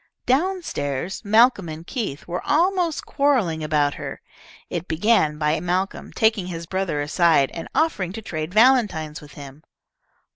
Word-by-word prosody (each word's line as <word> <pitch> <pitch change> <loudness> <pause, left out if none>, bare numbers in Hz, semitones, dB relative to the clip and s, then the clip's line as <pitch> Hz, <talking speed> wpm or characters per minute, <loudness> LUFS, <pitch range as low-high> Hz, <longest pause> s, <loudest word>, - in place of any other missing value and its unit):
Down 360 +8 +1
stairs, 145 - -3
Malcolm 220 -3 +4
and 160 +1 -8
Keith 200 - -4
were 175 +1 -3
almost 340 +2 +1
quarrelling 240 - +1
about 150 -2 +1
her. - - -7 0.5
It 175 +1 -5
began 160 -2 +2
by 150 +1 +1
Malcolm 180 +3 -2
taking 220 -4 +1
his 170 -2 -6
brother 185 -4 -2
aside 150 -2 +3
and 165 - -6
offering 205 - +1
to 225 - -6
trade 155 -2 -4
valentines 215 - +3
with 145 -1 -14
him. 140 0 -11
180 Hz, 145 wpm, -23 LUFS, 155-230 Hz, 0.5 s, Malcolm